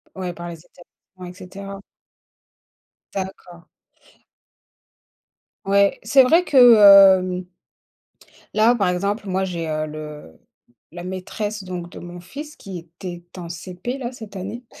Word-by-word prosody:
Ouais, 185 -2 -4
par 175 +1 -8
les 165 -2 -9
établissement 180 +1 -17
et 180 - -9
cetera. 195 +1 -9 1.3
D'accord. 185 -3 -7 2.0
Ouais, 200 0 +3
c'est 270 - +5
vrai 330 +7 +4
que, 250 -8 +7 0.4
hem 180 0 -4 1.1
là, 220 +3 +5
par 205 -6 0
exemple, 200 +4 -1
moi, 190 0 0
j'ai, 170 -3 -4
heu, 155 0 -1
le 150 - -9 0.5
la 175 0 -8
maîtresse, 200 +3 -5
donc, 175 -2 -6
de - - -10
mon 175 0 -10
fils 295 - -9
qui 190 -2 -8
était 175 +1 -10
en 170 -2 -7
CP, 180 - -6
là, 250 -2 -5
cette 215 -5 -10
année. 210 +7 -7
185 Hz, 130 wpm, -21 LUFS, 175-210 Hz, 2.0 s, que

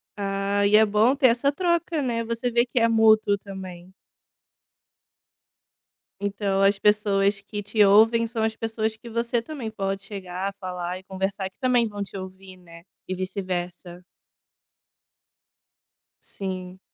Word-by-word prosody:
Ah, 200 0 -1
e 205 +1 +4
é 220 - +6
bom 215 +5 +3
ter 270 -1 +5
essa 245 +4 +2
troca, 340 -1 0
né, 235 -3 -1
você 230 +2 -2
vê 235 +1 +3
que 250 0 -1
é 230 - +4
mútuo 220 -2 +4
também. 190 -2 -10 2.3
Então, 200 -1 -1
as 195 0 +3
pessoas 200 -1 +2
que 205 +1 -6
te 205 +1 +2
ouvem 225 +3 +5
são 230 0 -4
as 220 0 0
pessoas 220 -1 -3
que 235 - -13
você 235 +1 0
também 245 -3 -6
pode 195 -2 -3
chegar, 195 -1 -5
falar 180 -1 -4
e 185 - -13
conversar, 190 0 -3
e 190 - -5
que - - -46
também 245 -3 +2
vão 205 -1 -5
te 195 - -9
ouvir, 190 0 -10
né, 170 -2 -15 0.3
e 185 - -2
vice-versa. 180 -2 -5 2.2
Sim. 185 -1 -7
205 Hz, 145 wpm, -24 LUFS, 190-225 Hz, 2.3 s, é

